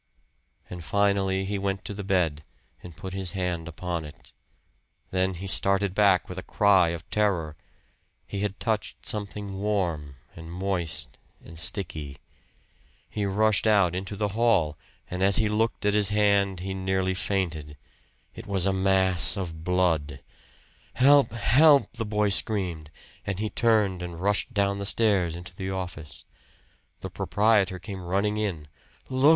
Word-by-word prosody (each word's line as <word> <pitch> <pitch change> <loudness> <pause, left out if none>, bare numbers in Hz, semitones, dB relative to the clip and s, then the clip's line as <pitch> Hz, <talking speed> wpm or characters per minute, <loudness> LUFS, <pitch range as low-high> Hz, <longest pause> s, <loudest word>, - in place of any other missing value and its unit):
And 90 -1 -8
finally 95 +2 +1
he 100 +1 -2
went 95 0 -3
to - - -4
the 100 0 -6
bed, 85 -6 0 0.4
and 85 -3 -12
put 95 +2 -7
his 95 -2 -4
hand 90 -3 -2
upon 85 0 -4
it. 75 -1 -13 0.8
Then 95 0 0
he 90 +3 -7
started 95 0 +1
back 100 -4 +3
with 90 0 -6
a - - -5
cry 95 -2 +3
of 85 0 -6
terror. 90 -7 0 0.7
He 100 - -5
had 100 -1 -3
touched 110 -2 -3
something 100 -2 -4
warm 85 -9 -2 0.2
and 80 0 -10
moist 85 -7 -3 0.3
and 85 - -12
sticky. 80 -5 -1 0.9
He 105 - -2
rushed 110 +2 +2
out 100 -5 +4
into 95 +2 -4
the 105 0 -1
hall, 100 -8 +2 0.3
and 90 +1 -5
as 95 0 +4
he 110 - +3
looked 110 0 -1
at 105 - +3
his 105 -2 +5
hand 100 -3 +2
he 95 +1 -4
nearly 95 0 -1
fainted. 85 -6 -3 0.6
It 115 - -10
was 95 -2 0
a 95 - +2
mass 95 -1 +2
of 85 -4 -5
blood! 80 -6 0 0.8
"Help! 140 +2 +5
Help!" 140 +6 +4
the 115 -2 -4
boy 105 0 +1
screamed; 85 -3 0 0.3
and 100 -2 -3
he 105 +1 -3
turned 105 -6 +2
and 85 -2 -6
rushed 100 +6 0
down 100 -2 0
the 100 - -4
stairs 100 -7 +2
into 85 +1 -10
the 95 0 -5
office. 90 -6 -7 0.8
The - - -6
proprietor 105 -3 +2
came 95 +1 -8
running 100 +4 0
in. 95 -8 -3 0.4
"Look!" 130 +3 +3
95 Hz, 155 wpm, -26 LUFS, 85-105 Hz, 0.9 s, his